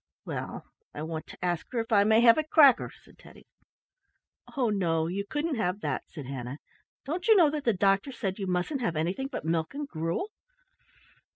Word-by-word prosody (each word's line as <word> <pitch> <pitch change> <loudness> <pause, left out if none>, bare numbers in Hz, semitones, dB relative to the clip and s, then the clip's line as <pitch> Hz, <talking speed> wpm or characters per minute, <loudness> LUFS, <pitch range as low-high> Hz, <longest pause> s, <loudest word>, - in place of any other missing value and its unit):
"Well, - - -5 0.3
I 150 - -5
want 160 0 -5
to - - -7
ask 175 -2 -1
her 245 - -1
if 225 0 -4
I 200 -2 +5
may 220 +1 +5
have 235 +4 +6
a - - +1
cracker," 295 -4 +5
said - - -21
Teddy. - - -16 1.1
"Oh, 245 -5 +2
no; 165 -5 +1
you 190 +4 -2
couldn't 295 +1 -2
have 185 -1 -1
that," - - -2
said 150 -5 -8
Hannah. 130 0 -6 0.5
"Don't 345 - -3
you 445 - +7
know 330 -7 +5
that 295 -2 -4
the 230 - +3
doctor 195 +6 +2
said 200 -6 -4
you 195 - -3
mustn't 180 +10 -1
have 175 -9 -1
anything 180 +12 -1
but 275 - -6
milk 165 - -1
and 290 0 -4
gruel? 165 - -3
200 Hz, 195 wpm, -28 LUFS, 170-275 Hz, 1.1 s, you